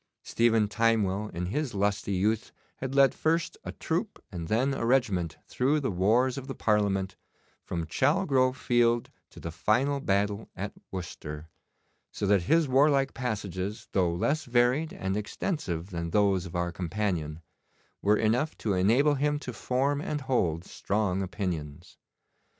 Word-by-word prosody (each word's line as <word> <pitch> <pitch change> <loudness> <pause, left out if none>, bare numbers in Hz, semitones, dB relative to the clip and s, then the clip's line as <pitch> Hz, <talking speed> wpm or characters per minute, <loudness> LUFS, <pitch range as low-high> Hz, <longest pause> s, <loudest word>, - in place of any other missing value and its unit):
Stephen 115 -2 +2
Timewell 105 -2 +1
in 90 +1 -4
his 130 +6 -2
lusty 100 0 0
youth 105 +4 0 0.3
had 135 0 -4
led 140 -1 +6
first 165 +1 0
a - - -5
troop 180 +6 -3
and 85 -4 -5
then 125 +8 +1
a 135 - -3
regiment 110 -10 +1
through 140 +5 +1
the 135 -6 -1
wars 115 +8 +2
of 135 - -10
the 135 - -5
Parliament, 100 -4 +1 0.5
from 85 -1 -3
Chalgrove 130 - +2
Field 120 -1 +2 0.2
to - - -13
the 85 - -5
final 130 - +1
battle 100 -2 0
at - - -5 0.2
Worcester, 80 -4 -7 0.6
so 105 - -3
that 100 -1 +4
his 160 - +3
warlike 135 +1 +3
passages, 100 -5 -4
though 90 -3 +2
less 145 - 0
varied 125 +6 +2
and 95 +1 -3
extensive 100 - -3
than 85 -1 -3
those 95 -1 +2
of 85 - -10
our 85 0 0
companion, 85 -4 -2 0.6
were 105 +1 +4
enough 120 +8 +1
to 105 - -1
enable 115 +11 +4
him 145 +1 +1
to 130 -4 -6
form 135 +6 0
and 150 -1 -3
hold 90 - 0
strong 100 -2 -1
opinions. 85 -6 -5
110 Hz, 150 wpm, -28 LUFS, 95-135 Hz, 0.6 s, led